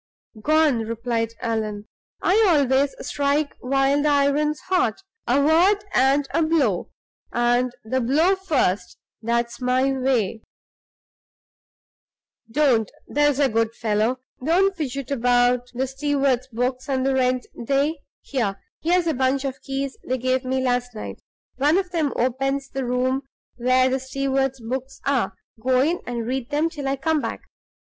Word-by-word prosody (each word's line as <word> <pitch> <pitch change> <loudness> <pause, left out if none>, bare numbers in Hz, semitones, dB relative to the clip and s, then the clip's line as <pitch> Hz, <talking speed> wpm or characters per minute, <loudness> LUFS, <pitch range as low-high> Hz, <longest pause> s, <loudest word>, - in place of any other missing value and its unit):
"Gone!" 310 -2 +3
replied 230 0 -2
Allan. 215 -2 -2 0.4
"I 425 +5 +4
always 280 -3 +3
strike 285 +1 0
while 270 +2 +2
the 300 - +2
iron's 290 +1 +2
hot 365 - 0 0.2
a 250 +4 +3
word 350 +8 +4
and 275 +2 +3
a 330 - +2
blow, 320 -1 +1 0.4
and 240 +1 +2
the 260 +4 0
blow 310 +10 +3
first, 300 - -1 0.2
that's 235 +2 -1
my 255 +2 +2
way. 255 -5 0 2.1
Don't, 240 -4 +2 0.2
there's 290 -1 +2
a 285 - +4
good 230 -1 0
fellow, 220 +3 0 0.3
don't 375 +6 +3
fidget 275 -4 -4
about 245 -1 +2
the 260 +2 0
steward's 270 -1 0
books 255 +2 -2
and 260 -1 0
the 270 - +2
rent 255 -1 +1 0.2
day. 280 +5 +1 0.2
Here! 210 -8 -2 0.2
here's 350 +2 +2
a 325 - +1
bunch 265 +1 +1
of 265 -1 -4
keys 270 0 -4
they 255 - -1
gave 255 +1 0
me 260 0 -1
last 245 -1 -1
night: 215 - -7 0.4
one 295 +5 +3
of 375 -2 -1
them 315 -5 0
opens 270 +2 -1
the 270 -1 -3
room 255 +2 0 0.4
where 255 +1 +3
the 260 +1 0
steward's 270 0 -1
books 260 +3 -5
are; 275 -3 0 0.3
go 255 +1 +2
in 325 +6 +1
and 235 -2 -3
read 255 0 -3
them 310 +3 0
till 290 -4 -5
I 270 - +1
come 310 +2 0
back. - - -4
265 Hz, 145 wpm, -23 LUFS, 245-290 Hz, 2.1 s, I